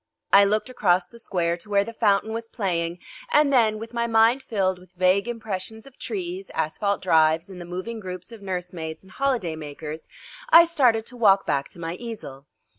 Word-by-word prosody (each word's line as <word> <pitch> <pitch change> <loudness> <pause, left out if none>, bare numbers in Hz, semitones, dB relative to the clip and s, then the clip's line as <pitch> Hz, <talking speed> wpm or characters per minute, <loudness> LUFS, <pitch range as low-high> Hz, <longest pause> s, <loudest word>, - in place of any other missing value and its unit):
I 200 0 +8
looked 210 +4 0
across 185 -8 +2
the 235 +6 -16
square 170 -6 -1
to 190 +4 -11
where 200 -1 +3
the 230 - -8
fountain 215 -1 +1
was 230 0 -5
playing 175 -7 -2 0.3
and 295 -6 +4
then, 220 -4 +4
with 225 +2 -9
my 235 0 0
mind 230 +3 +4
filled 190 -6 -1
with 185 0 -19
vague 185 +3 +2
impressions 220 -2 -5
of 275 -2 -17
trees, 375 -1 -5
asphalt 200 +6 -1
drives, 160 0 +3
and 180 -1 -9
the - - -7
moving 185 +6 -5
groups 185 +1 -7
of 225 -3 -11
nursemaids 180 -4 -5
and 190 - -18
holiday 245 -12 -1
makers, 155 +1 -7 0.4
I 335 -4 +9
started 250 -10 +2
to 245 - -10
walk 200 -4 +4
back 140 0 -1
to - - -14
my 165 0 -4
easel. 145 - -8
200 Hz, 190 wpm, -24 LUFS, 175-230 Hz, 0.4 s, I